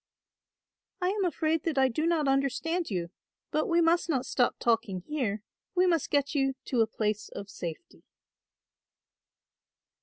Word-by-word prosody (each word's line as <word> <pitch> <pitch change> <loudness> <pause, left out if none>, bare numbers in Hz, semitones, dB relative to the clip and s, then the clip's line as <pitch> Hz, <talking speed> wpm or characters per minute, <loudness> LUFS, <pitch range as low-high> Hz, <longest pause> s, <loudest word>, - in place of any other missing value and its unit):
"I 360 -1 +1
am 400 -1 0
afraid 320 -1 +1
that 320 -4 -1
I 265 0 +5
do 305 +6 -1
not 325 -4 +2
understand 275 +6 0
you; 175 -4 -3 0.4
but 310 - +1
we 340 0 +3
must 335 +1 +3
not 265 -5 +1
stop 245 -2 +1
talking 225 -5 +1
here, 220 - -2 0.3
we 365 0 +4
must 335 -5 +2
get 285 0 +1
you 270 -2 +1
to 245 -3 +1
a 220 - +3
place 210 -1 -2
of 200 0 -7
safety." 165 -4 -7
275 Hz, 150 wpm, -29 LUFS, 225-330 Hz, 0.4 s, I